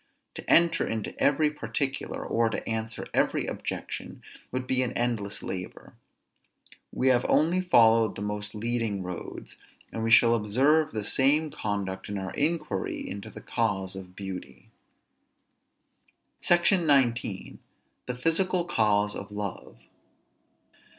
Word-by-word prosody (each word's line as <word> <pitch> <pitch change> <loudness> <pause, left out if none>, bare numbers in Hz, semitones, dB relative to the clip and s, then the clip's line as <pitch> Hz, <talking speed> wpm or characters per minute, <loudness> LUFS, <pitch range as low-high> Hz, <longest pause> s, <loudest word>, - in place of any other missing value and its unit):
To - - -9
enter 170 0 +4
into 110 -2 -3
every 150 +1 +3
particular, 135 0 -3
or 115 0 +1
to - - -5
answer 110 0 -3
every - - +1
objection, - - -6 0.3
would 130 0 -3
be 130 0 +1
an 125 -1 -1
endless 115 -4 -2
labor. 90 -1 -7 1.0
We 130 - +1
have 125 -1 +4
only 170 +4 +3
followed 115 -10 +4
the 100 - -5
most 105 +1 -4
leading 115 -3 -2
roads; 90 -1 -7 0.3
and 110 - -4
we 115 - 0
shall 115 +1 +6
observe 135 +9 +2
the 110 -1 -3
same 145 +7 +2
conduct 100 -2 -4
in 100 - -3
our 95 -1 -5
inquiry 150 - -2
into 100 0 -7
the - - -10
cause 95 -5 -1
of 95 -1 -10
beauty. 90 -11 -8 1.7
SECTION 175 0 +3
XIX. 120 -8 +1 0.5
THE 125 - -3
PHYSICAL 170 +6 +1
CAUSE 105 -6 +2
OF 100 +1 -7
LOVE. 105 -10 -6
115 Hz, 130 wpm, -27 LUFS, 100-140 Hz, 1.7 s, shall